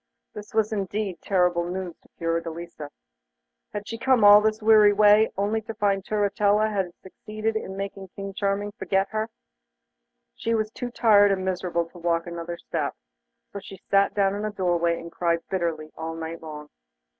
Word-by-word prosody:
This 210 -1 -9
was 220 0 +2
indeed 200 -2 -3
terrible 180 -3 +2
news 180 -2 -4
to - - -27
Fiordelisa. 165 -2 -4 0.8
Had 205 0 -6
she 230 - -6
come 260 -3 +3
all 205 0 +9
this 215 0 +1
weary 215 -1 +6
way 210 +1 +5
only 210 +3 0
to 220 +1 -8
find 200 -2 +1
Turritella 210 +1 +1
had 190 -4 -2
succeeded 215 +3 -4
in 190 -3 -4
making 195 -1 -5
King 195 0 -6
Charming 200 +1 -1
forget 195 -3 -1
her? 220 +1 -2 1.0
She 230 0 -1
was 215 -1 -1
too 245 +1 -5
tired 205 -4 +5
and 190 -1 -1
miserable 180 -2 -1
to 175 - -13
walk 170 0 0
another 170 0 -6
step, - - -3 0.6
so 200 - -5
she 195 0 -11
sat 200 0 +3
down 195 -1 +2
in 205 +1 -4
a 215 - -1
doorway 175 -4 0
and 170 0 -9
cried 170 -1 -1
bitterly 165 -4 -2
all 160 0 -5
night 165 0 -6
long. 150 -2 -9
195 Hz, 170 wpm, -25 LUFS, 170-210 Hz, 1.0 s, all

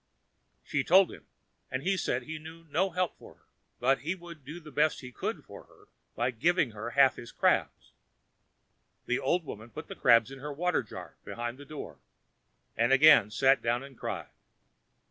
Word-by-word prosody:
She 140 -2 -1
told 190 +4 +5
him, - - -13 0.4
and 130 +1 -3
he 195 +3 +2
said - - -1
he 155 0 -6
knew 160 +2 -11
no 190 +6 +2
help 180 0 -2
for - - -14
her, - - -33 0.4
but 135 +3 +3
he 170 +5 -3
would 170 -4 -12
do 150 +6 -8
the 155 -3 -13
best 150 +2 +1
he 125 -1 -9
could - - -4
for - - -12
her - - -23 0.3
by 125 - 0
giving 145 +3 +1
her 110 +2 -6
half 135 -2 +6
his 120 - -9
crabs. - - 0 1.1
The 125 - 0
old 175 -1 0
woman 110 -3 -8
put 155 +6 -9
the - - -6
crabs 115 -1 +4
in 135 - -9
her 150 +2 -6
water 180 +5 0
jar, - - -10
behind 120 +2 -5
her 145 - -10
door, 140 - -8 0.8
and 115 +3 +2
again 135 -6 +7
sat 135 +5 +3
down 120 +2 0
and 140 -1 -12
cried. - - -5
140 Hz, 185 wpm, -30 LUFS, 125-160 Hz, 1.1 s, again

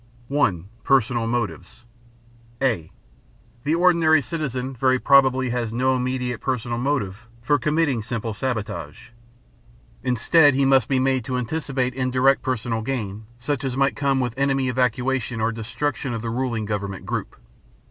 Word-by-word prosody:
(1) 100 - +1 0.2
Personal 120 -3 +2
Motives 115 -1 -4 0.7
(a) 110 -12 0 0.7
The 155 +3 +1
ordinary 170 -3 +4
citizen 135 -2 -3
very 130 +1 +2
probably 130 -2 +4
has 120 -2 -2
no 130 +3 +1
immediate 125 -2 -2
personal 120 -2 -2
motive 120 -6 -2
for 145 +5 +1
committing 150 -3 +1
simple 115 0 -4
sabotage. 110 - -4 0.9
Instead, 130 +4 +4
he 135 0 +3
must 135 -3 +4
be 135 - +1
made 130 -1 +1
to 130 -1 -2
anticipate 130 0 -2
indirect 130 +1 +2
personal 115 -3 -2
gain, 110 -4 -4
such 135 +2 -3
as 130 -1 -2
might 135 0 +2
come 140 -2 +1
with 125 -3 -1
enemy 135 -1 +1
evacuation 125 -1 0
or 110 +1 +1
destruction 120 +3 -3
of 115 - -5
the 115 - -2
ruling 120 -3 -2
government 100 -2 -4
group. - - -4
125 Hz, 140 wpm, -23 LUFS, 115-135 Hz, 0.9 s, ordinary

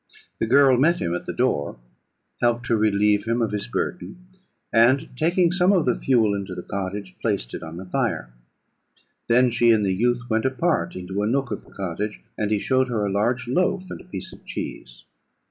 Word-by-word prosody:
The - - 0
girl 135 +1 +5
met 165 +7 +3
him 85 -2 -1
at 90 - -4
the - - -1
door, 70 - -1 0.6
helped 120 0 +1
to 115 - +2
relieve 105 -1 +2
him 115 +1 0
of 115 -3 0
his 105 -1 -3
burden, 180 +7 -4 0.5
and, 120 +4 +4
taking 170 +4 +2
some 180 +1 +3
of 180 -6 +3
the 125 - +3
fuel 115 -6 +2
into 100 -2 -4
the 90 - -6
cottage, 95 -1 -5
placed 100 - -1
it - - -5
on 80 +1 -8
the 95 - -7
fire; - - -2 0.9
then 125 +1 +4
she 120 +1 +3
and 110 -3 +4
the 95 - +1
youth 120 +4 +1
went 110 0 0
apart 155 +6 0
into 95 +2 -4
a 105 - 0
nook 135 +2 0
of - - -5
the - - -19
cottage, 100 +3 -4 0.2
and 105 - -1
he 105 - +2
showed 130 +5 +1
her 110 -4 -1
a 100 - -1
large 120 +6 0
loaf 185 +7 0
and - - -7
a - - -17
piece 180 - -7
of - - -15
cheese. - - -7
115 Hz, 205 wpm, -23 LUFS, 100-130 Hz, 0.9 s, girl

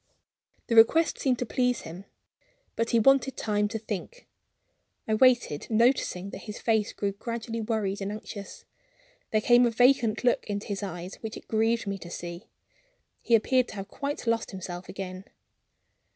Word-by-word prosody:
The 230 - -1
request 320 +9 +5
seemed 255 -3 +1
to 245 - -2
please 250 +2 0
him; 175 +4 -9 0.7
but 230 0 -1
he 235 - +3
wanted 270 +3 +3
time 210 -1 0
to 220 +2 -4
think. 220 - -6 0.8
I 220 - +1
waited; 240 - +3
noticing 220 -5 +2
that - - -9
his 210 - -5
face 220 -2 +1
grew 200 -1 -2
gradually 230 +2 -5
worried 210 -3 -2
and 195 +1 -3
anxious. 210 -1 -8 0.6
There 215 - +1
came 240 +2 +5
a - - +2
vacant 240 -1 +3
look 245 - +2
into 205 -1 -3
his 200 -1 -4
eyes 180 -1 -6
which 220 -1 -6
it - - -13
grieved 225 +1 +1
me 200 -1 -3
to 175 - -9
see; 175 +4 -7 0.7
he 235 - +4
appeared 250 +3 +2
to - - -9
have 195 0 -6
quite 285 +2 -4
lost 230 -1 0
himself 180 -2 -7
again. 185 0 -6
220 Hz, 165 wpm, -27 LUFS, 195-240 Hz, 0.8 s, request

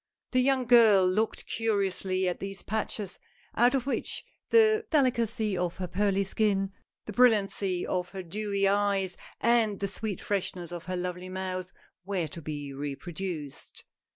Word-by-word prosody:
The 255 - +3
young 265 -1 +2
girl 225 -6 +7
looked 215 +5 0
curiously 195 -4 0
at 180 - -1
these 195 -1 -6
patches, 210 -2 -3 0.4
out 245 +3 +4
of 265 - +1
wliich 280 - -2 0.3
the 435 -1 +5
delicacy 235 -7 +2
of 180 -1 -2
her 185 - -3
pearly 200 +2 +1
skin, 195 -1 +1 0.3
the 210 - -6
brilliancy 200 -6 +3
of 180 -1 -2
her 190 0 -6
dewy 200 +2 -1
eyes, 200 -2 +1 0.2
and 225 -4 +3
the 200 - -1
sweet 200 -1 -3
freshness 180 -3 -3
of 175 -1 -6
her 185 0 -3
lovely 180 0 -4
mouth 185 0 -4 0.3
were 190 -3 -1
to 165 - -8
be 145 -2 -5
reproduced. 150 +2 -6
195 Hz, 150 wpm, -29 LUFS, 180-220 Hz, 0.4 s, girl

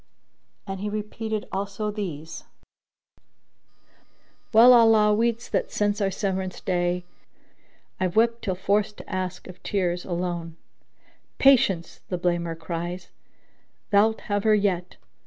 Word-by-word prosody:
'"[FN#9] - - -4
And 195 - -7
he 210 +2 -3
repeated 215 +1 -4
also 200 +2 -3
these, 165 -6 -6 2.1
"Well 235 +2 +8
Allah 225 -3 +6
weets 230 +1 0
that - - -1
since 205 0 0
our 195 - +2
severance 190 -1 -3
day 175 -1 -1 0.4
* - - -38
I've 185 -2 -1
wept 230 +1 +3
till 190 -4 -2
forced 200 +2 0
to - - -11
ask 185 -2 -4
of 185 - -12
tears 180 -3 -1
a - - -9
loan: 170 -2 -3 0.8
'Patience! 200 -11 +3
(the 180 - -1
blamer 170 -2 -1
cries): 175 +2 -5 0.8
thou'lt 215 +2 +3
have 205 -1 -2
her 215 -1 +5
yet!' 185 -4 -1
195 Hz, 130 wpm, -25 LUFS, 180-210 Hz, 2.1 s, Well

